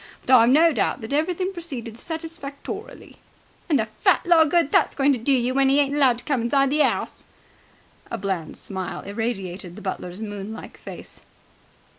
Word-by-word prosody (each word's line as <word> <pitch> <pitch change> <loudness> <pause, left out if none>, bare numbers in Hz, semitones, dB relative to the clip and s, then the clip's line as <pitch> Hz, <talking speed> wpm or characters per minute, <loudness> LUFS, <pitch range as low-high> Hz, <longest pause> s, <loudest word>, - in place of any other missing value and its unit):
But 260 - +6
I've 235 -1 +6
no 320 +5 +5
doubt 280 - 0
that 220 +5 -5
everything 360 +5 0
proceeded 265 - -6
satisfactorily." 320 -1 -7 0.5
"And 290 -5 +3
a 220 - +1
fat 215 - +1
lot 340 -2 +6
of - - -4
good 335 -3 +2
that's - - +3
going 280 0 +3
to 250 - -2
do 240 +5 0
you, 255 -1 +2
when 270 0 +3
'e 275 +2 +4
ain't 280 -1 +2
allowed 270 -5 +4
to - - -9
come 275 -5 0
inside 275 +3 +2
the 300 +1 +2
'ouse!" - - 0 0.8
A - - -3
bland 190 -5 -3
smile 190 -2 -5
irradiated 195 -4 -4
the - - -10
butler's 185 -1 -5
moon 205 -1 -6
like - - -10
face. - - -10
265 Hz, 185 wpm, -23 LUFS, 220-295 Hz, 0.8 s, But